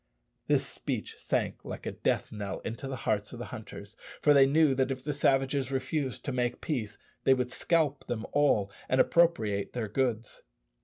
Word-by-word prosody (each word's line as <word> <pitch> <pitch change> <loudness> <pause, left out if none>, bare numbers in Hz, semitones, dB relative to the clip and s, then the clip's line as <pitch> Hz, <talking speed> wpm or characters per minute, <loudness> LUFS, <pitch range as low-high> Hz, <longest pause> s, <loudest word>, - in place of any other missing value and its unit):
This - - +3
speech - - -5
sank - - -1
like - - -7
a - - -2
death - - -1
knell 100 -2 -4
into 115 +4 -5
the 135 - -3
hearts 105 0 0
of - - -7
the 120 - -5
hunters, 110 -1 -9 0.2
for 150 - +5
they 135 -1 +7
knew 150 0 +4
that 130 0 +1
if 130 -1 -4
the 150 +1 -2
savages 135 -1 +1
refused 135 0 -2
to 140 - -1
make 125 -1 -1
peace, 115 -9 -3 0.3
they 135 - +5
would 125 -1 -2
scalp 150 -2 +1
them 115 -2 -3
all 110 -9 +3 0.2
and 130 - +2
appropriate 110 -15 +3
their 120 -3 -2
goods. 115 0 -1
130 Hz, 185 wpm, -30 LUFS, 110-140 Hz, 0.3 s, they